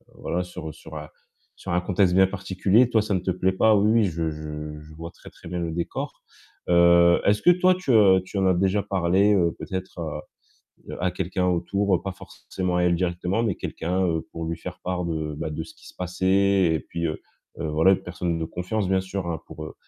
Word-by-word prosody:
voilà, 90 +1 -2
sur 85 -3 -8
sur - - -12
un - - -7 0.5
sur - - -7
un 90 - +2
contexte 90 -1 +2
bien 95 0 +6
particulier. 95 +5 +2
Toi, 110 - +3
ça 105 - -2
ne 95 - +1
te 95 +1 -2
plaît 95 +1 +1
pas, 110 +3 +4
oui, 105 +1 +3
oui, 115 -1 +4
je 80 -3 -2
je 75 0 -7
je 75 +1 -14
vois 85 +1 -8
très, - - -14
très - - -15
bien 90 +1 -4
le 85 -1 -2
décor. 85 +1 -5 0.5
Heu, 85 0 +5
est-ce 105 +1 +2
que 175 - +7
toi, 180 +1 +4
tu, 180 -7 -2
heu, 100 -5 +6
tu 100 - -6
en 95 - +2
as 95 - +3
déjà 95 +3 +1
parlé, 95 +2 +2
heu, 85 -3 +2
peut-être 95 -1 -6
à 75 -2 -4 0.8
à 90 - +1
quelqu'un, 90 0 -2
autour, 95 +2 +1
pas 95 - -3
forcément 90 0 -5
à 90 - +2
elle 90 - +3
directement, 90 +4 -1
mais 105 -6 0
quelqu'un, 90 +3 -2
heu, 80 -2 -1
pour 85 - -6
lui 80 0 -3
faire 90 +1 -8
part 90 -1 -2
de, 80 -2 -3
bah, 80 - -4
de 80 +1 -4
ce 80 - -14
qui - - -16
se - - -15
passait 95 +1 +2
et 80 - +1
puis, 85 +2 -6
heu 75 - -4 0.4
heu, - - -3
voilà 80 +5 +4
une 95 - +2
personne 90 -1 -3
de 80 - -2
confiance, 90 +5 -3
bien 95 0 +2
sûr, 95 -1 -5
heu, 85 -1 -2
pour 75 0 -9
90 Hz, 225 wpm, -24 LUFS, 85-95 Hz, 0.8 s, que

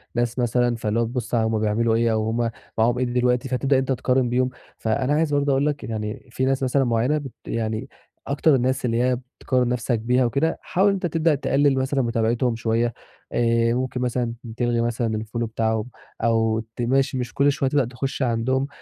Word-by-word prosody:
ناس 120 +1 0
مثلًا 120 0 +2
فاللي 110 0 -1
هو - - +3
تبُص 120 0 -3
علي 110 -1 +2
هم 110 -1 0
بيعملوا 110 +2 +1
إيه 115 0 +2
أو 110 0 0
هم 115 +1 0 0.3
معاهم 120 +2 +2
إيه 130 - +1
دلوقتي، 125 +1 +1
فتبدأ 135 +2 +1
إن - - +4
أنت 135 0 -1
تقارن 130 -1 +1
بيهم. 125 +1 +1 0.3
فأنا 130 +5 0
عايز 150 -1 +1
برضه 145 0 +2
أقول 135 +1 +2
لك 145 -1 -1
يعني 110 +2 -5
في 130 - -1
ناس 135 +1 +1
مثلًا 135 +1 +2
معيّنة 120 +5 +1
بت 135 -4 -6
يعني 110 +3 -3 0.4
أكتر 145 +1 +3
الناس 130 +1 0
اللي 115 0 +1
هي 125 -1 +2 0.2
بتقارن 125 -2 +1
نَفْسك 120 -1 0
بيها 125 +3 +2
وكده، 140 +7 0
حاول 190 +3 +1
إن 200 - +4
أنت 185 -2 -2
تبدأ 165 -2 +2
تقلِّل 140 0 +2
مثلًا 135 +1 +1
متابعتهم 115 0 +1
شوية 115 +1 0 0.4
آآ، 115 0 +2
ممكن 125 0 -2
مثلًا 125 -1 -1 0.2
تلغي 120 -1 +1
مثلًا 115 -2 -1
الfollow 115 +2 -4
بتاعهم 110 0 -1 0.3
أو 115 -1 +2 0.2
ت - - -4
ماش 135 +3 +1
مش 125 -2 -3
كل 140 +1 +3
شويه 135 -1 0
تبقى 140 -3 +2
تخُش 135 +3 -4
عندهم. 130 +3 +1
125 Hz, 200 wpm, -23 LUFS, 115-135 Hz, 0.4 s, إن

